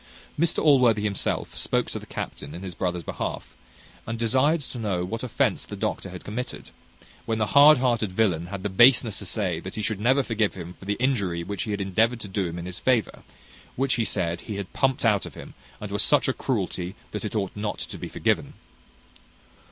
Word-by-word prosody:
Mr 170 Hz, 0 st, +2 dB
Allworthy 125 Hz, -8 st, +5 dB
himself 100 Hz, -2 st, -1 dB
spoke -, -, 0 dB
to -, -, -4 dB
the -, -, -13 dB
captain 70 Hz, +3 st, -6 dB
in 90 Hz, -, -8 dB
his 95 Hz, -2 st, -5 dB
brother's 90 Hz, 0 st, -2 dB
behalf, -, -, -5 dB, 0.5 s
and 115 Hz, 0 st, -3 dB
desired 130 Hz, +8 st, +2 dB
to 125 Hz, -2 st, -7 dB
know 95 Hz, -5 st, -1 dB
what 115 Hz, +5 st, -4 dB
offence 125 Hz, -, 0 dB
the -, -, -7 dB
doctor -, -, -3 dB
had -, -, -9 dB
committed; 120 Hz, +4 st, -6 dB, 0.6 s
when 110 Hz, -, 0 dB
the 110 Hz, -, +1 dB
hard 145 Hz, +1 st, +9 dB
hearted 120 Hz, -5 st, +1 dB
villain 90 Hz, -5 st, +1 dB
had 95 Hz, 0 st, -6 dB
the 105 Hz, -, -1 dB
baseness 115 Hz, 0 st, +5 dB
to 100 Hz, -, -4 dB
say 90 Hz, -5 st, -1 dB
that 95 Hz, +3 st, -8 dB
he 110 Hz, -, -3 dB
should 100 Hz, -1 st, -1 dB
never 130 Hz, +5 st, +3 dB
forgive 110 Hz, -4 st, 0 dB
him 90 Hz, -1 st, -7 dB
for 95 Hz, -, -14 dB
the 100 Hz, +1 st, 0 dB
injury 100 Hz, -10 st, 0 dB
which 100 Hz, +1 st, -4 dB
he -, -, -6 dB
had 100 Hz, -1 st, -1 dB
endeavoured 110 Hz, +5 st, +1 dB
to 105 Hz, -, -7 dB
do 95 Hz, -1 st, -1 dB
him 85 Hz, 0 st, -6 dB
in 85 Hz, -, -5 dB
his 90 Hz, -1 st, -6 dB
favour; 125 Hz, -4 st, +1 dB, 0.5 s
which, 135 Hz, 0 st, +1 dB
he 120 Hz, -, +1 dB
said, 85 Hz, -5 st, -1 dB
he 105 Hz, -, -6 dB
had 100 Hz, -2 st, -6 dB
pumped 135 Hz, -3 st, +1 dB
out 105 Hz, -3 st, +3 dB
of -, -, -12 dB
him, -, -, -10 dB, 0.3 s
and -, -, -6 dB
was -, -, 0 dB
such -, -, +4 dB
a -, -, +2 dB
cruelty 90 Hz, +2 st, -2 dB, 0.2 s
that 105 Hz, -, -4 dB
it 105 Hz, -, -4 dB
ought 100 Hz, -3 st, -1 dB
not 105 Hz, 0 st, -3 dB
to -, -, -6 dB
be -, -, -5 dB
forgiven. -, -, 0 dB
105 Hz, 215 wpm, -25 LUFS, 95-120 Hz, 0.6 s, hard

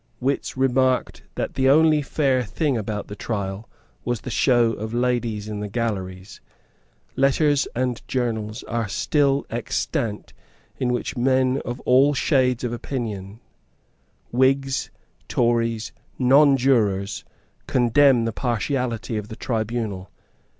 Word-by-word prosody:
Wits 135 Hz, +1 st, -2 dB
remarked 130 Hz, -1 st, +1 dB
that -, -, -3 dB
the 135 Hz, 0 st, +2 dB
only 155 Hz, +1 st, +5 dB
fair 135 Hz, -3 st, +1 dB
thing 140 Hz, +5 st, -1 dB
about 105 Hz, -2 st, -3 dB
the 105 Hz, -, -7 dB
trial 100 Hz, -1 st, -4 dB, 0.3 s
was 120 Hz, -2 st, -2 dB
the -, -, -6 dB
show 120 Hz, -3 st, +3 dB
of 110 Hz, +2 st, -5 dB
ladies 120 Hz, -4 st, -1 dB
in 105 Hz, -1 st, -5 dB
the 105 Hz, -, -4 dB
galleries. 100 Hz, -4 st, -4 dB, 0.7 s
Letters 140 Hz, +1 st, +2 dB
and 125 Hz, -1 st, -1 dB
journals 110 Hz, -4 st, -2 dB
are 115 Hz, -1 st, -2 dB
still 140 Hz, +6 st, +1 dB
extant 115 Hz, -2 st, -3 dB, 0.5 s
in 125 Hz, -1 st, 0 dB
which 125 Hz, -, -2 dB
men 130 Hz, +1 st, +2 dB
of 120 Hz, +1 st, -4 dB
all 135 Hz, +3 st, +4 dB
shades 130 Hz, -4 st, +2 dB
of 120 Hz, -1 st, -2 dB
opinion, 110 Hz, -5 st, -5 dB, 0.9 s
Whigs, 135 Hz, +2 st, +1 dB, 0.4 s
Tories, 115 Hz, -2 st, 0 dB, 0.3 s
Nonjurors, 125 Hz, -7 st, +3 dB, 0.4 s
condemn 125 Hz, 0 st, +4 dB
the 115 Hz, -, -2 dB
partiality 120 Hz, -2 st, -2 dB
of 105 Hz, -1 st, -5 dB
the 110 Hz, -, -8 dB
tribunal. 110 Hz, -5 st, -3 dB
120 Hz, 120 wpm, -23 LUFS, 110-130 Hz, 0.9 s, only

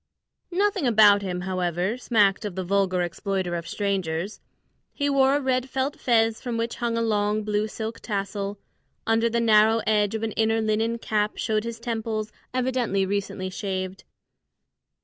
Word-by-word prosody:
Nothing 385 Hz, -4 st, +1 dB
about 210 Hz, -3 st, +6 dB
him, 180 Hz, -2 st, -3 dB
however, 180 Hz, +2 st, -1 dB
smacked 210 Hz, -6 st, +2 dB
of 205 Hz, -4 st, -4 dB
the 190 Hz, -, -2 dB
vulgar 185 Hz, -1 st, +1 dB
exploiter 185 Hz, +1 st, -2 dB
of 170 Hz, -1 st, -4 dB
strangers. 195 Hz, -2 st, -2 dB, 0.5 s
He 285 Hz, -1 st, 0 dB
wore 270 Hz, 0 st, +4 dB
a -, -, +2 dB
red 260 Hz, -1 st, 0 dB
felt 265 Hz, +2 st, -2 dB
fez 225 Hz, -2 st, +2 dB
from 240 Hz, -2 st, -3 dB
which 230 Hz, +1 st, -2 dB
hung 235 Hz, -1 st, -1 dB
a 230 Hz, -, +1 dB
long 210 Hz, -1 st, +1 dB
blue 210 Hz, 0 st, 0 dB
silk 220 Hz, +1 st, -5 dB
tassel; 200 Hz, -1 st, -3 dB, 0.5 s
under 225 Hz, +1 st, +2 dB
the 235 Hz, +1 st, 0 dB
narrow 220 Hz, 0 st, +5 dB
edge 210 Hz, 0 st, +2 dB
of 220 Hz, -, -3 dB
an 225 Hz, -, -1 dB
inner 225 Hz, +1 st, +1 dB
linen 220 Hz, +1 st, 0 dB
cap 210 Hz, -2 st, -1 dB
showed 215 Hz, -1 st, 0 dB
his 230 Hz, -1 st, -5 dB
temples, 220 Hz, -2 st, -3 dB, 0.2 s
evidently 250 Hz, -6 st, 0 dB
recently 190 Hz, -1 st, -3 dB
shaved. 185 Hz, -1 st, -4 dB
215 Hz, 160 wpm, -25 LUFS, 195-230 Hz, 0.5 s, about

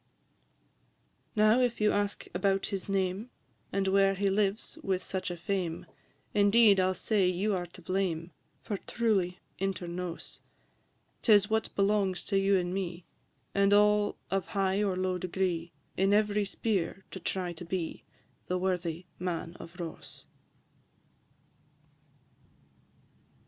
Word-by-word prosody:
VI. 210 Hz, -, +2 dB
Now, 215 Hz, +3 st, +6 dB
if 245 Hz, -2 st, +1 dB
you 210 Hz, 0 st, +4 dB
ask 205 Hz, 0 st, -1 dB
about 195 Hz, +2 st, +1 dB
his 195 Hz, 0 st, -3 dB
name, 195 Hz, +3 st, -1 dB, 0.4 s
And 195 Hz, -1 st, 0 dB
where 195 Hz, 0 st, +4 dB
he 195 Hz, 0 st, +1 dB
lives 200 Hz, +1 st, 0 dB
with 190 Hz, -2 st, -1 dB
such 185 Hz, -1 st, -2 dB
a 175 Hz, -, -5 dB
fame, 175 Hz, -2 st, -2 dB, 0.5 s
Indeed, 205 Hz, 0 st, +6 dB
I 185 Hz, -, +4 dB
'll 185 Hz, -, 0 dB
say 200 Hz, 0 st, +2 dB
you 190 Hz, +4 st, +1 dB
are 175 Hz, -2 st, -2 dB
to 175 Hz, +1 st, -14 dB
blame, 180 Hz, -2 st, -1 dB, 0.3 s
For 205 Hz, -, -3 dB
truly, 195 Hz, -7 st, 0 dB, 0.2 s
inter 195 Hz, -2 st, -2 dB
nos, 175 Hz, 0 st, -6 dB, 0.8 s
'Tis 205 Hz, -2 st, +5 dB
what 220 Hz, 0 st, +1 dB
belongs 195 Hz, -2 st, +1 dB
to 195 Hz, -1 st, +2 dB
you 195 Hz, 0 st, +4 dB
and 180 Hz, 0 st, -1 dB
me, 180 Hz, -2 st, -4 dB, 0.5 s
And 200 Hz, 0 st, +4 dB
all 210 Hz, 0 st, +4 dB
of 195 Hz, -2 st, 0 dB
high 195 Hz, 0 st, +1 dB
or 195 Hz, -3 st, +1 dB
low 185 Hz, -1 st, 0 dB
degree, 175 Hz, -2 st, -1 dB, 0.2 s
In 195 Hz, +2 st, +3 dB
every 210 Hz, 0 st, +3 dB
sphere 195 Hz, -3 st, -2 dB
to 190 Hz, -, -6 dB
try 180 Hz, 0 st, -2 dB
to 170 Hz, -, -9 dB
be 170 Hz, -1 st, -4 dB, 0.4 s
The 180 Hz, -, 0 dB
worthy 180 Hz, -2 st, -2 dB
Man 175 Hz, -1 st, -3 dB
of 175 Hz, +2 st, -11 dB
Ross. 170 Hz, -2 st, -7 dB
190 Hz, 140 wpm, -30 LUFS, 180-205 Hz, 0.8 s, Now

